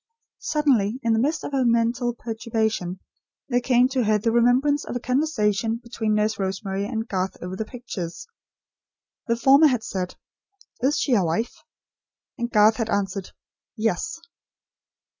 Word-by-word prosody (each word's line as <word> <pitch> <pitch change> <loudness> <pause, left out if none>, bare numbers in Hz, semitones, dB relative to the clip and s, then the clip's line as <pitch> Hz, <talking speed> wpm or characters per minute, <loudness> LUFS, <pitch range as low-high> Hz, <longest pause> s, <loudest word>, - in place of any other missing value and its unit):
Suddenly, 260 -7 +1
in 230 - +2
the 220 - +2
midst 295 +6 0
of - - -5
her 270 -2 +1
mental 235 +1 +1
perturbation, 220 -5 -2 0.5
there 245 -1 +2
came 245 0 +4
to 260 -3 0
her 215 0 +3
the 225 +2 0
remembrance 250 +5 +3
of - - -6
a - - -1
conversation 230 -5 0
between 230 -2 -2
Nurse 215 0 0
Rosemary 195 +1 -2
and 225 0 -3
Garth 190 -2 -2
over 180 +1 -6
the 220 - -3
pictures. 215 -8 -7 1.0
The 230 - +2
former 275 +6 +6
had 250 -5 0
said: 185 -4 -4 0.6
"Is 275 +5 +1
she 270 - +1
a 205 -5 +4
wife?" 170 +8 -1 0.8
And 235 0 -3
Garth 215 -1 +5
had 225 -2 -2
answered: 195 -2 -2 0.5
"Yes." 225 - -1
230 Hz, 150 wpm, -24 LUFS, 210-250 Hz, 1.0 s, former